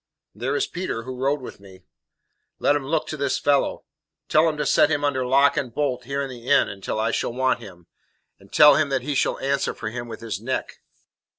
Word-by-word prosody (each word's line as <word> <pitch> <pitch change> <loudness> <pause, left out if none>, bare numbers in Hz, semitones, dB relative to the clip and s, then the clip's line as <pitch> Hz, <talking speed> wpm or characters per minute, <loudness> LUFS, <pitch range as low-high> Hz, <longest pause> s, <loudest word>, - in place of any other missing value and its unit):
"There 125 +7 -2
is - - +1
Peter, 175 -10 -4
who 130 +1 -6
rode 135 +3 0
with 125 - -9
me." 95 -2 -16 0.7
"Let 145 - +2
him 140 -2 -3
look 160 +1 0
to 155 - -6
this 140 -1 0
fellow. 140 -1 +1 0.5
Tell 155 +2 +4
him 155 - -4
to 150 - -1
set - - +4
him 145 -2 0
under 130 -3 0
lock 140 +4 +4
and 135 -4 -2
bolt 125 -2 -2
here 140 +1 -2
in 135 - -5
the 120 -1 -11
inn - - +4
until 100 +2 -4
I 110 +1 +1
shall 115 - -2
want 130 +1 +1
him, 85 -1 -13 0.5
and - - -20
tell 150 -1 +7
him 155 -1 +1
that 135 -2 -1
he 145 +2 -2
shall - - +1
answer 140 +1 -1
for 110 - -5
him 120 0 -6
with 110 -1 -8
his 110 -3 -5
neck." 130 +3 -4
135 Hz, 225 wpm, -23 LUFS, 120-145 Hz, 0.7 s, tell